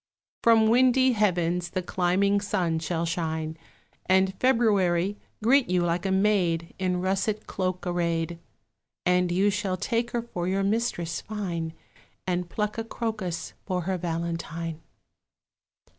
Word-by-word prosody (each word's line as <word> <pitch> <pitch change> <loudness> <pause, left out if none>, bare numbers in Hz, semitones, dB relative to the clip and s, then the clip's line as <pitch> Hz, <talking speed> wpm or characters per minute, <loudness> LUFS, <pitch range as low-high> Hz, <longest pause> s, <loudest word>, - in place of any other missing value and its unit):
From 225 -1 +5
windy 255 +2 +5
heavens 180 -5 +1
the 185 0 -3
climbing 190 +3 +2
sun 180 -5 0
shall 165 +1 -2
shine, 160 -1 -2 0.5
And 190 +1 +4
February 205 -7 +3 0.3
greet 260 +1 +4
you 180 -1 +2
like 175 +2 0
a - - 0
maid 190 -4 +1
In 180 -1 0
russet 195 +3 -1
cloak 185 -1 -3
array'd; 170 -1 -1 0.7
And 180 0 +3
you 195 +3 +3
shall 195 -2 -1
take 230 +4 -1
her 235 -1 -2
for 180 -7 -4
your 195 +1 +1
mistress 195 -5 -1
fine, 175 -6 -4 0.5
And 180 -1 -1
pluck 210 +3 -2
a - - -1
crocus 215 -8 -4
for 180 -2 0
her 185 +1 -2
valentine. 165 -1 -3
185 Hz, 130 wpm, -27 LUFS, 170-210 Hz, 0.7 s, From